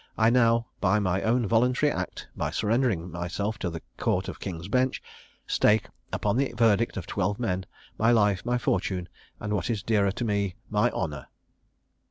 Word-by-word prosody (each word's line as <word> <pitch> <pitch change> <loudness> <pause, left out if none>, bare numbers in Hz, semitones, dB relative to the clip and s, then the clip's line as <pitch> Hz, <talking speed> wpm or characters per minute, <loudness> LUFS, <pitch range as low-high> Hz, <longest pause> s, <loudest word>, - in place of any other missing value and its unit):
I 110 +1 +4
now, 115 -1 +4
by 100 +1 +3
my 95 -2 +1
own 120 +1 +2
voluntary 125 +7 +3
act, - - -4
by - - -1
surrendering 105 -6 0
myself 90 +6 -3
to 90 - -1
the 80 -1 -7
Court - - 0
of - - -6
King's 85 -2 -5
Bench, 130 +4 +1 0.5
stake, 105 -1 +3 0.2
upon 105 +2 0
the 135 0 0
verdict 115 0 +3
of - - -4
twelve 105 0 -1
men, 95 -6 -1 0.3
my 115 - +4
life, 105 -4 +3
my 120 +1 +1
fortune, 95 -5 -1 0.3
and, 105 0 -3
what 90 -4 -1
is 110 -5 -1
dearer 100 -3 +2
to 120 - -3
me, 100 -4 0 0.2
my - - +3
honour. - - -4
105 Hz, 175 wpm, -27 LUFS, 95-115 Hz, 0.5 s, I